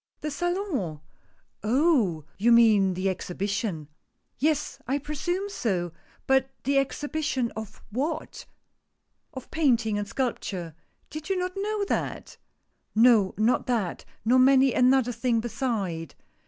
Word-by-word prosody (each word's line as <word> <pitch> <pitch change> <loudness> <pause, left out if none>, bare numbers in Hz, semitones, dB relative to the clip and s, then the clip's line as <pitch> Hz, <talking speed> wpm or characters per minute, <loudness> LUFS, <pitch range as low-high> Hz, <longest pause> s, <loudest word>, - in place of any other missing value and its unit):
"The 305 - -3
Salon? 345 - -2 0.6
Oh! 225 - +2
you 235 +4 +4
mean 215 -5 +5
the 185 +2 -1
Exhibition." 190 -3 -2 0.5
"Yes, 295 0 0
I 270 +3 +1
presume 330 +7 -3
so 190 - -2 0.2
— - - -32
but 265 0 +4
the 275 +1 +3
Exhibition 290 -2 -2
of 220 -2 -9
what 300 +8 -3 0.4
?" - - -50
"Of 260 - -9
Painting 235 -9 +2
and 205 - -3
Sculpture. 200 - -3 0.4
Did 310 +3 -7
you 385 - +1
not 365 0 -1
know 410 +1 -1
that?" - - -3 0.6
"No, 225 -4 +5
not 220 +4 +2
that, 225 -8 -1 0.2
nor 250 +3 +5
many 265 0 +5
another 255 -1 +4
thing 235 0 0
beside. 210 - -3
250 Hz, 125 wpm, -26 LUFS, 205-295 Hz, 0.6 s, mean